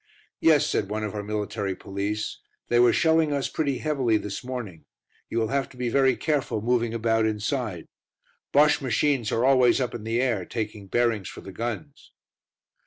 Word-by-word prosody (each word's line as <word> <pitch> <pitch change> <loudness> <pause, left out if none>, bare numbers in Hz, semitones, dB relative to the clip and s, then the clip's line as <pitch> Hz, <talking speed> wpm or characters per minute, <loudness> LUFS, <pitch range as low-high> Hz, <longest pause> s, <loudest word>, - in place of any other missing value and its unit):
"Yes," 155 -3 +5
said 100 - -1
one 110 +1 -2
of 105 - -3
our 105 - -3
military 105 -1 -3
police, 100 +3 -4 0.3
"they 120 - +3
were 120 -1 +6
shelling 160 -2 +3
us 140 -2 0
pretty 140 -4 -1
heavily 135 -8 +1
this 105 +1 -5
morning: 120 -10 -6 0.4
you - - -3
will 110 -1 +1
have 140 +1 -1
to 130 - -16
be 125 -1 -1
very 135 0 +3
careful 145 -8 -1
moving 120 +1 +1
about 115 -1 +1
inside. 110 - -2 0.7
Bosche 145 +1 +4
machines 130 -2 +1
are 115 +2 +1
always 130 -2 +5
up 125 -2 -1
in 120 -3 -6
the 115 +2 -1
air, 120 -7 +1
taking 105 0 -5
bearings 115 -3 0
for - - -10
the 95 - -9
guns." 120 +8 -6
120 Hz, 175 wpm, -25 LUFS, 105-135 Hz, 0.7 s, were